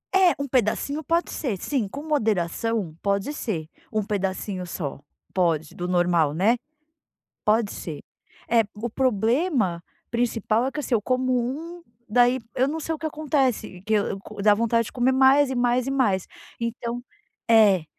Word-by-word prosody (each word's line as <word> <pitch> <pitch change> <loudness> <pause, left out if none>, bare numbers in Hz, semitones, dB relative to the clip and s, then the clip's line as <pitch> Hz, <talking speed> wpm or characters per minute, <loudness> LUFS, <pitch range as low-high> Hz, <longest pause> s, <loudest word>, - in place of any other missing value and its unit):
É, 375 -2 +5
um 280 - -2
pedacinho 265 +5 0
pode 335 +4 0
ser, 240 -10 -2
sim, 240 +1 -1
com 280 +8 -7
moderação 220 - 0
pode 200 +7 0
ser. 175 - -3 0.2
Um 215 -1 0
pedacinho 195 -2 -2
só, 150 -6 -5 0.3
pode, 165 -4 +1
do 180 0 -4
normal, 175 -4 +2
né. 210 +8 +3 0.9
Pode 215 0 +3
ser. 155 -4 -6 0.5
É, 230 -1 +4
o 230 +3 -4
problema 235 - +1 0.3
principal 230 0 +1
é - - -1
que, 300 - -4
assim, 275 - -1
eu 225 - +3
como 255 +3 0
um, 295 +8 -2 0.3
daí 245 +3 +4 0.2
eu 260 +2 +2
não 315 - -2
sei 320 +1 -2
o - - -7
que 315 - -3
acontece 275 -11 -1
que 220 - +2
eu 205 -2 0
co 205 0 -8
dá 210 0 +6
vontade 230 +1 +1
de - - -9
comer 255 +1 +2
mais, 270 +2 +5
e - - -1
mais, 245 0 +2
e - - -1
mais, 215 -9 +1 0.3
então, 235 +1 -3 0.5
é, 205 -7 +6
230 Hz, 165 wpm, -24 LUFS, 200-265 Hz, 0.9 s, dá